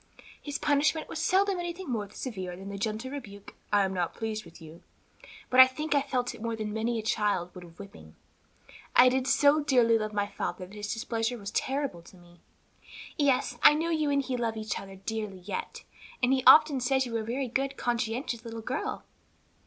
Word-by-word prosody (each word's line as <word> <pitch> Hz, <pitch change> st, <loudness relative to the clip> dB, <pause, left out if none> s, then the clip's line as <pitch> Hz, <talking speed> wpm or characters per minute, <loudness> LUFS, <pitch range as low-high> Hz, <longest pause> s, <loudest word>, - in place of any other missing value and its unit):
"His 290 Hz, -1 st, -4 dB
punishment 300 Hz, +2 st, +1 dB
was 320 Hz, -, -6 dB
seldom 380 Hz, +3 st, +2 dB
anything 345 Hz, +1 st, -5 dB
more 215 Hz, -6 st, -3 dB
severe 190 Hz, -6 st, -6 dB
than 195 Hz, +2 st, -9 dB
the 200 Hz, -, -6 dB
gentle 220 Hz, +5 st, -3 dB
rebuke, 205 Hz, -8 st, -9 dB, 0.2 s
'I 205 Hz, -1 st, +4 dB
am 190 Hz, -, -3 dB
not 175 Hz, -2 st, -2 dB
pleased 220 Hz, -1 st, -4 dB
with 170 Hz, -, -14 dB
you,' 160 Hz, 0 st, -13 dB, 0.7 s
but 255 Hz, -, +4 dB
I 260 Hz, -, +11 dB
think 300 Hz, +4 st, -3 dB
I 285 Hz, -, +3 dB
felt 250 Hz, -2 st, -2 dB
it -, -, -12 dB
more 230 Hz, 0 st, -2 dB
than 215 Hz, -1 st, -4 dB
many 225 Hz, +2 st, -1 dB
a 220 Hz, -, -3 dB
child 205 Hz, -5 st, 0 dB
would 180 Hz, -, -10 dB
a -, -, -11 dB
whipping; 165 Hz, -, -13 dB, 0.8 s
I 255 Hz, +1 st, +8 dB
did 260 Hz, +1 st, 0 dB
so 290 Hz, +2 st, +4 dB
dearly 245 Hz, -6 st, +3 dB
love 215 Hz, 0 st, -3 dB
my 205 Hz, -1 st, 0 dB
father 195 Hz, -2 st, -5 dB
that 185 Hz, -, -16 dB
his 210 Hz, 0 st, -5 dB
displeasure 225 Hz, +1 st, -2 dB
was 200 Hz, -2 st, -7 dB
terrible 270 Hz, -9 st, -2 dB
to 175 Hz, +2 st, -17 dB
me." 175 Hz, 0 st, -19 dB, 0.8 s
"Yes, 265 Hz, -4 st, +1 dB
I 295 Hz, -, +8 dB
know 330 Hz, +2 st, -1 dB
you 310 Hz, -2 st, +1 dB
and 280 Hz, -1 st, +1 dB
he 260 Hz, -1 st, -3 dB
love 230 Hz, -2 st, -2 dB
each 215 Hz, -1 st, -3 dB
other 195 Hz, 0 st, -10 dB
dearly 200 Hz, -1 st, -5 dB
yet, 465 Hz, -, -6 dB, 0.4 s
and 250 Hz, +2 st, +4 dB
he 260 Hz, -1 st, +1 dB
often 300 Hz, -3 st, +8 dB
says 265 Hz, +2 st, +1 dB
you 240 Hz, -, -7 dB
were 230 Hz, -, 0 dB
a -, -, -3 dB
very 250 Hz, +4 st, -2 dB
good, 270 Hz, +3 st, -2 dB
conscientious 240 Hz, 0 st, -2 dB
little 230 Hz, -1 st, -7 dB
girl." 355 Hz, -, -3 dB
230 Hz, 205 wpm, -28 LUFS, 205-275 Hz, 0.8 s, I